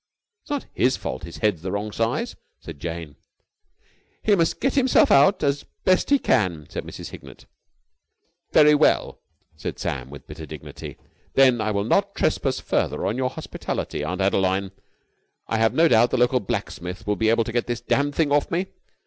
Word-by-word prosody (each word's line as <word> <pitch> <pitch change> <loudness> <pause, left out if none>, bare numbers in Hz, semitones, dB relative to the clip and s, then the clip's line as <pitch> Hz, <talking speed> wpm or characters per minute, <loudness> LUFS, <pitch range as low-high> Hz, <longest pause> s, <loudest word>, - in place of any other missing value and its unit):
"It's - - -23
not 290 -2 -2
his 130 +1 +2
fault - - -5
his 85 - -9
head's 95 -7 +1
the 95 +2 -4
wrong 105 +2 -3
size," 115 +2 -1 0.2
said 80 -4 -10
Jane. 80 -3 -6 1.1
"He 210 - +3
must 165 -3 +1
get 270 - +1
himself 260 -2 +4
out 145 +8 +5
as 140 0 0 0.2
best 185 -1 +3
he 285 - +5
can," 90 - 0
said - - -4
Mrs. - - -8
Hignett. - - -12 1.1
"Very 150 -1 +6
well," 150 +1 +2 0.3
said - - -6
Sam 65 0 -4
with 70 0 -11
bitter - - -9
dignity. - - -9 0.4
"Then 130 -4 +5
I 110 - 0
will 100 -1 0
not 200 - +1
trespass 135 -4 0
further - - -1
on 100 - 0
your 130 0 0
hospitality, - - -5
Aunt 90 +2 -3
Adeline. 95 0 +1 0.8
I 110 - -1
have 115 0 +2
no 165 +1 +5
doubt 120 -3 +4
the - - 0
local 125 +1 +3
blacksmith 90 -3 -5
will 105 - 0
be 110 +1 +1
able 115 0 +3
to 115 - -5
get 120 -1 0
this 120 -1 -3
damned 145 +1 0
thing 155 -3 +1
off 145 0 +2
me. 180 +3 -1
115 Hz, 185 wpm, -23 LUFS, 95-145 Hz, 1.1 s, Very